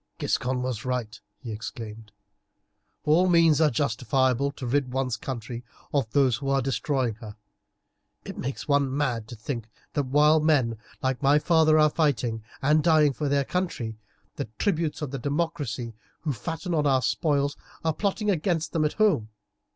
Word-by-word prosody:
"Giscon 125 Hz, 0 st, -1 dB
was 125 Hz, -4 st, -3 dB
right," 125 Hz, -4 st, -3 dB, 0.2 s
he 120 Hz, -5 st, -8 dB
exclaimed. 110 Hz, 0 st, -7 dB, 0.9 s
"All 170 Hz, +5 st, +4 dB
means 165 Hz, -3 st, +5 dB
are 155 Hz, -, +5 dB
justifiable 130 Hz, +1 st, +1 dB
to 135 Hz, -, -7 dB
rid 130 Hz, +1 st, 0 dB
one's 130 Hz, -2 st, -1 dB
country 120 Hz, -1 st, -6 dB, 0.3 s
of 135 Hz, -6 st, +1 dB
those 130 Hz, -1 st, +3 dB
who 135 Hz, 0 st, -4 dB
are 135 Hz, 0 st, +3 dB
destroying 135 Hz, -2 st, 0 dB
her. 105 Hz, -2 st, -8 dB, 0.9 s
It -, -, -6 dB
makes 135 Hz, +2 st, -5 dB
one 140 Hz, -2 st, +2 dB
mad 120 Hz, -7 st, -1 dB
to 120 Hz, -, -8 dB
think 115 Hz, 0 st, -5 dB, 0.2 s
that 145 Hz, -5 st, -1 dB
while 150 Hz, +3 st, +5 dB
men 135 Hz, -8 st, +2 dB, 0.2 s
like 130 Hz, -1 st, 0 dB
my 140 Hz, +1 st, +5 dB
father 155 Hz, 0 st, +4 dB
are 155 Hz, -1 st, +5 dB
fighting 125 Hz, -8 st, 0 dB, 0.2 s
and 150 Hz, +3 st, +4 dB
dying 155 Hz, -4 st, +4 dB
for 145 Hz, +3 st, -2 dB
their 140 Hz, -1 st, +2 dB
country, 125 Hz, -12 st, -3 dB, 0.4 s
the -, -, -2 dB
tribunes 165 Hz, -6 st, 0 dB
of 140 Hz, -, -4 dB
the 135 Hz, -, -4 dB
democracy, 145 Hz, -5 st, -2 dB, 0.3 s
who 150 Hz, -3 st, -1 dB
fatten 165 Hz, -, -4 dB
on 150 Hz, -2 st, +2 dB
our 130 Hz, -2 st, +3 dB
spoils, 145 Hz, +1 st, +1 dB, 0.3 s
are 160 Hz, -, +2 dB
plotting 205 Hz, +3 st, 0 dB
against 165 Hz, -2 st, 0 dB
them 155 Hz, -2 st, +2 dB
at 150 Hz, -, 0 dB
home. 200 Hz, -, +2 dB
140 Hz, 165 wpm, -26 LUFS, 125-155 Hz, 0.9 s, means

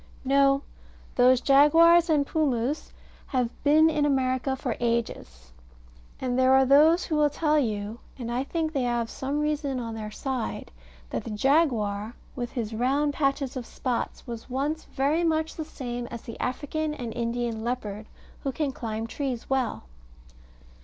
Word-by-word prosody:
No, 275 Hz, +1 st, +4 dB, 0.5 s
those 250 Hz, 0 st, +5 dB
jaguars 330 Hz, +5 st, +6 dB
and 295 Hz, -3 st, +3 dB
pumus 280 Hz, -3 st, -1 dB, 0.4 s
have 250 Hz, -3 st, 0 dB
been 305 Hz, +2 st, +6 dB
in 300 Hz, -2 st, +1 dB
America 265 Hz, -1 st, +1 dB
for 260 Hz, -3 st, -3 dB
ages: 220 Hz, -, -3 dB, 0.7 s
and 255 Hz, -1 st, -1 dB
there 260 Hz, 0 st, +5 dB
are 265 Hz, 0 st, +6 dB
those 305 Hz, +6 st, +5 dB
who 315 Hz, -, -1 dB
will 300 Hz, -1 st, +4 dB
tell 305 Hz, +1 st, +1 dB
you 215 Hz, -3 st, -2 dB, 0.2 s
and 235 Hz, -2 st, -5 dB
I 245 Hz, +2 st, 0 dB
think 315 Hz, +2 st, -2 dB
they 275 Hz, -, 0 dB
have 240 Hz, -2 st, -1 dB
some 275 Hz, +2 st, -3 dB
reason 295 Hz, -3 st, -1 dB
on 230 Hz, -2 st, -5 dB
their 215 Hz, -1 st, -5 dB
side 255 Hz, +1 st, -4 dB, 0.4 s
that -, -, -2 dB
the -, -, -7 dB
jaguar, 220 Hz, -4 st, +1 dB, 0.2 s
with 240 Hz, -2 st, -4 dB
his 230 Hz, -4 st, -3 dB
round 275 Hz, +6 st, +1 dB
patches 275 Hz, -2 st, 0 dB
of 250 Hz, -3 st, -5 dB
spots, 250 Hz, -3 st, -3 dB
was 235 Hz, -1 st, -7 dB
once 285 Hz, +5 st, -2 dB
very 290 Hz, +5 st, 0 dB
much 320 Hz, -1 st, 0 dB
the 315 Hz, -, -4 dB
same 245 Hz, -5 st, -5 dB
as 235 Hz, -1 st, -8 dB
the 230 Hz, -, -9 dB
African 300 Hz, +4 st, -2 dB
and 240 Hz, -5 st, -5 dB
Indian 235 Hz, -1 st, -2 dB
leopard, 220 Hz, -3 st, -4 dB, 0.3 s
who 275 Hz, -, -2 dB
can 285 Hz, +1 st, -1 dB
climb 225 Hz, -3 st, -4 dB
trees 255 Hz, 0 st, -4 dB
well. 265 Hz, -2 st, 0 dB
260 Hz, 160 wpm, -26 LUFS, 235-295 Hz, 0.7 s, jaguars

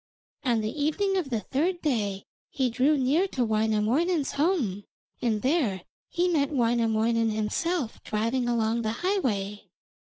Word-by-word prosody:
On 235 Hz, -4 st, +2 dB
the 215 Hz, 0 st, -2 dB
evening 385 Hz, +6 st, +1 dB
of 355 Hz, -7 st, -1 dB
the 230 Hz, -4 st, -1 dB
third 340 Hz, -, -1 dB
day 205 Hz, -9 st, -1 dB, 0.2 s
he 260 Hz, -4 st, 0 dB
drew 275 Hz, +6 st, +3 dB
near 285 Hz, +9 st, +2 dB
to 255 Hz, -9 st, -1 dB
Wainamoinen's 220 Hz, +9 st, +1 dB
home, 280 Hz, -, 0 dB, 0.4 s
and 220 Hz, -4 st, 0 dB
there 255 Hz, -, +1 dB, 0.3 s
he 350 Hz, +1 st, +1 dB
met 295 Hz, -6 st, +2 dB
Wainamoinen 230 Hz, -3 st, +2 dB
himself 225 Hz, +6 st, -2 dB
driving 230 Hz, +4 st, -1 dB
along 230 Hz, 0 st, +1 dB
the 220 Hz, -1 st, -1 dB
highway. 210 Hz, -, -1 dB
240 Hz, 135 wpm, -27 LUFS, 220-305 Hz, 0.4 s, drew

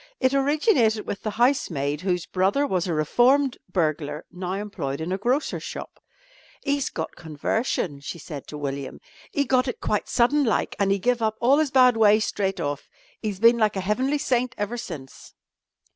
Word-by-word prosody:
It 260 Hz, 0 st, +2 dB
originated 275 Hz, -, +2 dB
with 200 Hz, -, -5 dB
the 215 Hz, -, -2 dB
housemaid 175 Hz, -, 0 dB
whose 180 Hz, -2 st, -1 dB
brother 195 Hz, +12 st, +1 dB
was 185 Hz, -8 st, -1 dB
a 175 Hz, -, -1 dB
reformed 250 Hz, -, +3 dB
burglar 155 Hz, -4 st, -1 dB
now 180 Hz, 0 st, -4 dB
employed 195 Hz, -9 st, -4 dB
in 160 Hz, +3 st, -4 dB
a 190 Hz, -, 0 dB
grocer's 250 Hz, +8 st, 0 dB
shop. -, -, -8 dB, 0.7 s
"'E's 280 Hz, -1 st, 0 dB
got 160 Hz, -, -5 dB
conversion," 160 Hz, -, -2 dB
she 145 Hz, -, -7 dB
said 145 Hz, -3 st, -8 dB
to 150 Hz, -, -7 dB
William. 140 Hz, -1 st, -5 dB, 0.3 s
"'E 285 Hz, -2 st, 0 dB
got 255 Hz, 0 st, +2 dB
it 250 Hz, -, -4 dB
quite 210 Hz, -, -1 dB
sudden 280 Hz, +5 st, +3 dB
like, 230 Hz, -, 0 dB
an' 200 Hz, -1 st, +2 dB
'e 195 Hz, -, +3 dB
give 240 Hz, +4 st, 0 dB
up 220 Hz, -1 st, +1 dB
all 265 Hz, +5 st, +4 dB
'is 310 Hz, -2 st, +2 dB
bad 255 Hz, -3 st, +5 dB
ways 215 Hz, 0 st, +5 dB
straight 195 Hz, -1 st, -2 dB
off. 145 Hz, 0 st, -3 dB, 0.3 s
'E's 205 Hz, -3 st, -3 dB
bin 230 Hz, +2 st, +5 dB
like 215 Hz, -2 st, +2 dB
a -, -, -1 dB
heavenly 255 Hz, +9 st, 0 dB
saint 255 Hz, -2 st, 0 dB
ever 205 Hz, +3 st, -2 dB
since." 160 Hz, -, -9 dB
210 Hz, 180 wpm, -24 LUFS, 170-255 Hz, 0.7 s, bad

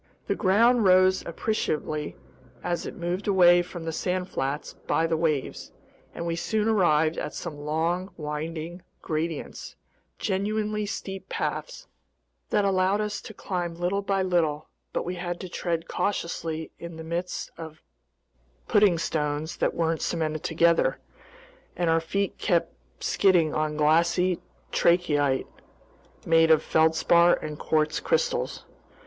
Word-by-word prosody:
The -, -, 0 dB
ground 230 Hz, +4 st, +4 dB
rose 185 Hz, 0 st, +5 dB
appreciably 155 Hz, -5 st, -2 dB, 0.5 s
as 175 Hz, -1 st, -2 dB
it -, -, -7 dB
moved 180 Hz, +3 st, -3 dB
away 175 Hz, -3 st, +6 dB
from 175 Hz, -1 st, -8 dB
the 165 Hz, -, -2 dB
sand 180 Hz, +2 st, -2 dB
flats 140 Hz, -2 st, -3 dB
by 165 Hz, -, 0 dB
the 165 Hz, 0 st, +1 dB
waves, 155 Hz, -4 st, -1 dB, 0.4 s
and 170 Hz, -, -4 dB
we 170 Hz, -1 st, -1 dB
soon 215 Hz, +5 st, 0 dB
arrived 165 Hz, -7 st, +3 dB
at -, -, -5 dB
some 170 Hz, -4 st, -5 dB
long, 165 Hz, +5 st, -1 dB
winding 160 Hz, +3 st, -5 dB, 0.2 s
gradients, 160 Hz, 0 st, -4 dB, 0.4 s
genuinely 210 Hz, +1 st, -1 dB
steep 195 Hz, -1 st, -6 dB
paths -, -, -3 dB, 0.6 s
that 205 Hz, -, +2 dB
allowed 190 Hz, +1 st, +2 dB
us 210 Hz, 0 st, -2 dB
to 220 Hz, -, -10 dB
climb 175 Hz, -4 st, -3 dB
little 180 Hz, +4 st, -1 dB
by 195 Hz, -1 st, 0 dB
little; 160 Hz, -5 st, 0 dB, 0.2 s
but -, -, -2 dB
we 180 Hz, -, -2 dB
had 175 Hz, 0 st, -4 dB
to 185 Hz, -, -5 dB
tread 170 Hz, -1 st, -2 dB
cautiously 165 Hz, -5 st, -2 dB
in 170 Hz, -1 st, -8 dB
the 160 Hz, -, -8 dB
midst 170 Hz, +2 st, -4 dB
of 160 Hz, -1 st, -10 dB, 0.8 s
pudding 205 Hz, -5 st, +4 dB
stones 150 Hz, -1 st, -2 dB
that -, -, 0 dB
weren't 165 Hz, -1 st, 0 dB
cemented 155 Hz, -2 st, -1 dB
together, 170 Hz, +1 st, +2 dB, 0.8 s
and 175 Hz, -2 st, +1 dB
our 165 Hz, 0 st, +3 dB
feet 195 Hz, +4 st, -2 dB
kept 170 Hz, -2 st, +1 dB, 0.3 s
skidding 175 Hz, -6 st, +3 dB
on 155 Hz, 0 st, -1 dB
glassy 170 Hz, +4 st, +3 dB, 0.3 s
trachyte, 145 Hz, -6 st, +2 dB, 0.8 s
made 165 Hz, 0 st, +5 dB
of 160 Hz, -1 st, +5 dB
feldspar 160 Hz, +2 st, +4 dB
and 150 Hz, -1 st, -7 dB
quartz 155 Hz, 0 st, +1 dB
crystals. -, -, -1 dB
170 Hz, 135 wpm, -26 LUFS, 160-185 Hz, 0.8 s, away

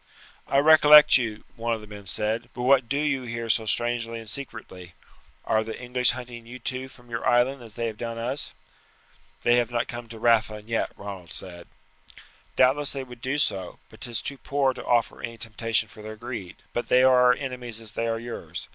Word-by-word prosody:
"I 135 Hz, -, +1 dB
recollect 150 Hz, 0 st, +8 dB
you," 115 Hz, -4 st, -3 dB
one 115 Hz, -1 st, -1 dB
of 110 Hz, -, -8 dB
the -, -, -10 dB
men 105 Hz, -1 st, -11 dB
said; 110 Hz, +5 st, -2 dB
"but 125 Hz, -, -4 dB
what 130 Hz, -2 st, +4 dB
do 140 Hz, -, 0 dB
you 145 Hz, -3 st, +1 dB
here 115 Hz, -1 st, -5 dB
so 110 Hz, 0 st, +2 dB
strangely 115 Hz, +1 st, 0 dB
and 110 Hz, -, -11 dB
secretly? 100 Hz, -8 st, -6 dB, 0.5 s
Are 110 Hz, 0 st, +2 dB
the 110 Hz, 0 st, -7 dB
English 125 Hz, 0 st, +1 dB
hunting 120 Hz, -2 st, -5 dB
you 125 Hz, +2 st, -8 dB
too 130 Hz, +1 st, -4 dB
from 120 Hz, -2 st, -18 dB
your 115 Hz, -, -3 dB
island 125 Hz, +2 st, +3 dB
as 115 Hz, -3 st, -13 dB
they 115 Hz, -, -2 dB
have 110 Hz, -2 st, -4 dB
done 115 Hz, -1 st, -4 dB
us?" 120 Hz, +5 st, -3 dB, 0.9 s
"They 120 Hz, 0 st, +5 dB
have 120 Hz, -1 st, +1 dB
not 120 Hz, -1 st, -1 dB
come 120 Hz, -1 st, -7 dB
to 115 Hz, -, -9 dB
Rathlin 110 Hz, -2 st, +2 dB
yet," 115 Hz, -1 st, 0 dB
Ronald 95 Hz, -4 st, -8 dB
said. 85 Hz, +3 st, -6 dB, 0.9 s
"Doubtless 135 Hz, +3 st, +3 dB
they 135 Hz, -1 st, -4 dB
would 125 Hz, -2 st, -12 dB
do 130 Hz, +4 st, -1 dB
so, 95 Hz, -11 st, 0 dB
but -, -, -16 dB
'tis 120 Hz, -2 st, -1 dB
too 140 Hz, -1 st, -4 dB
poor 135 Hz, +1 st, +1 dB
to -, -, -8 dB
offer 120 Hz, -2 st, +1 dB
any 115 Hz, 0 st, -6 dB
temptation 115 Hz, 0 st, -1 dB
for 110 Hz, 0 st, -13 dB
their 110 Hz, 0 st, -7 dB
greed. 110 Hz, -5 st, -7 dB, 0.2 s
But 120 Hz, -, -2 dB
they 125 Hz, +1 st, +5 dB
are 130 Hz, -1 st, +6 dB
our 125 Hz, -, +7 dB
enemies 125 Hz, -4 st, -5 dB
as 110 Hz, -2 st, -10 dB
they 115 Hz, +1 st, -2 dB
are 115 Hz, 0 st, 0 dB
yours. 120 Hz, +1 st, -7 dB
120 Hz, 210 wpm, -26 LUFS, 110-125 Hz, 0.9 s, recollect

